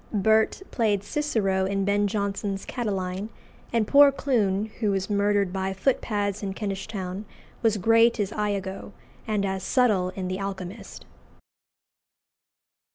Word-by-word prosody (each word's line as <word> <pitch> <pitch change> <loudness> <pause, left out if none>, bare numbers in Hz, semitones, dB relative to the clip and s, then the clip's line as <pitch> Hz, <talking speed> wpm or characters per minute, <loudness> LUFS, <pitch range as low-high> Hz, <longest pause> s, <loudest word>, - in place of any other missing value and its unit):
Burt 220 - +2
played 210 -4 +1
Cicero 205 -8 0
in 195 0 -1
Ben 205 +1 +2
Jonson's 200 -1 -2
"Catiline;" 195 -4 -3 0.4
and 230 -2 +2
poor 285 0 +7
Clun, 215 -7 0
who 215 -3 +1
was 195 +1 -1
murdered 200 -2 +2
by 190 0 -1
footpads 205 -2 -1
in 195 -2 -4
Kentish 195 -2 -4
Town, 190 -2 -5 0.4
was 220 -2 +2
great 230 +3 +4
as 205 -1 0
Iago, 200 -2 -3 0.3
and 210 -2 0
as 190 -1 -2
Subtle 210 -6 +2
in 185 -2 -3
"The 185 +1 -3
Alchymist." 195 0 -6
200 Hz, 130 wpm, -26 LUFS, 190-220 Hz, 0.4 s, poor